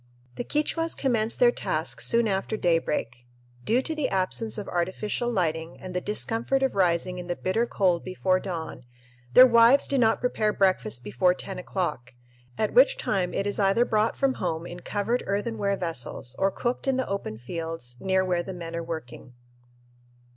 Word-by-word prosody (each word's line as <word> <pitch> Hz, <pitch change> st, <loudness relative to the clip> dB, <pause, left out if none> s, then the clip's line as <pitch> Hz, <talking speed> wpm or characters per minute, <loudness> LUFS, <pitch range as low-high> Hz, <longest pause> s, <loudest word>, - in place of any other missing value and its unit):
The -, -, -4 dB
Quichuas 325 Hz, +4 st, -1 dB
commence 230 Hz, -5 st, 0 dB
their -, -, +5 dB
task -, -, -2 dB
soon 235 Hz, -1 st, +3 dB
after 195 Hz, +2 st, -1 dB
daybreak. 150 Hz, -, -1 dB, 0.4 s
Due 240 Hz, -, +2 dB
to 320 Hz, -, -2 dB
the 305 Hz, -3 st, -1 dB
absence 195 Hz, +4 st, -1 dB
of 205 Hz, -, -5 dB
artificial 195 Hz, +7 st, -2 dB
lighting 165 Hz, -5 st, -2 dB
and 185 Hz, -1 st, -8 dB
the 180 Hz, -, -1 dB
discomfort 230 Hz, +6 st, -1 dB
of 265 Hz, -, +1 dB
rising 180 Hz, -1 st, +1 dB
in 175 Hz, -, -7 dB
the 175 Hz, -, -2 dB
bitter 225 Hz, +8 st, 0 dB
cold 180 Hz, -6 st, +1 dB
before 185 Hz, 0 st, 0 dB
dawn, 165 Hz, -8 st, -6 dB, 0.5 s
their 255 Hz, -, +11 dB
wives 235 Hz, +2 st, +6 dB
do 275 Hz, -, 0 dB
not 225 Hz, -2 st, +3 dB
prepare 215 Hz, -4 st, 0 dB
breakfast 190 Hz, -, +1 dB
before 125 Hz, -, +2 dB
ten 190 Hz, 0 st, -6 dB
o'clock, 150 Hz, -10 st, -4 dB, 0.4 s
at 215 Hz, -, -1 dB
which -, -, +5 dB
time 185 Hz, -3 st, -1 dB
it 195 Hz, -, -2 dB
is 205 Hz, 0 st, -1 dB
either 200 Hz, +4 st, +3 dB
brought 215 Hz, -1 st, +1 dB
from 275 Hz, -1 st, +2 dB
home 165 Hz, -6 st, -3 dB
in 175 Hz, 0 st, -8 dB
covered 210 Hz, +6 st, -1 dB
earthenware 200 Hz, 0 st, -1 dB
vessels 135 Hz, -6 st, -3 dB
or 195 Hz, -, +3 dB
cooked 240 Hz, +7 st, -3 dB
in 265 Hz, -1 st, +2 dB
the 260 Hz, -, -1 dB
open 195 Hz, -, -4 dB
fields 160 Hz, -1 st, -6 dB
near 190 Hz, +2 st, +1 dB
where 180 Hz, -1 st, 0 dB
the 190 Hz, +1 st, -7 dB
men 170 Hz, -1 st, -6 dB
are 170 Hz, -, -3 dB
working. 125 Hz, -6 st, -8 dB
190 Hz, 175 wpm, -26 LUFS, 170-230 Hz, 0.5 s, their